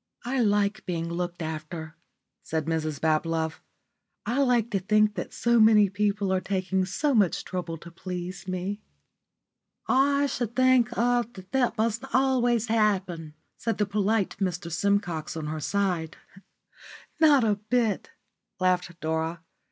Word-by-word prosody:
"I 260 +2 -1
like 205 -2 +1
being 170 -1 -2
looked 175 0 -3
after," 160 +1 -6 0.5
said 160 -2 -3
Mrs 155 -3 -2
Bablove. 160 0 0 0.6
"I 240 +5 0
like 240 -3 +2
to 195 - +1
think 215 +2 +3
that - - -5
so 235 0 +2
many 215 -3 +6
people 205 -1 0
are 185 - +1
taking 190 -1 -1
so 285 +10 0
much 205 -7 +2
trouble 175 -3 -4
to 170 +2 -12
please 180 +1 -6
me." 185 +3 -3 1.1
"I 280 +2 +3
should 240 -4 -3
think 255 -2 +4
er 245 0 +3
that 190 -2 -12
that 245 -3 +1
must 225 +2 0
always 245 -3 +2
happen," 190 -8 0 0.2
said 230 - -2
the 210 - +2
polite 205 0 0
Mr 180 -3 -2
Simcox 175 -4 -1
on 155 - -4
her 155 +1 -3
other - - -4
side. 180 -2 -1 1.0
"Not 295 -5 +6
a 210 -2 +2
bit," 220 0 0 0.5
laughed 180 -2 0
Dora. 160 +1 -2
195 Hz, 145 wpm, -27 LUFS, 170-230 Hz, 1.1 s, many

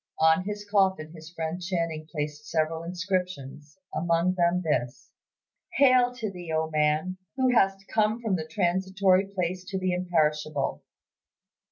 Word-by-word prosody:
On 160 +3 +4
his 205 0 -5
coffin 190 -6 +1
his 160 -1 -11
friend 165 +1 -4
Channing 165 -3 -2
placed 150 -1 -4
several 160 0 0
inscriptions, 175 -5 -4 0.2
among 170 +2 +1
them 180 0 +1
this, 125 -5 -2 0.6
"Hail 255 -3 +5
to 220 -5 -4
thee, 175 -3 -8
O 160 0 0
man! 155 +4 +1 0.2
who 260 -1 +2
hast 195 -3 +2
come 215 +1 +1
from 220 -5 0
the 160 -3 -4
transitory 190 +2 +2
place 185 -2 -3
to 190 +1 -4
the 185 -1 0
imperishable." 155 -5 0
175 Hz, 140 wpm, -27 LUFS, 160-190 Hz, 0.6 s, Hail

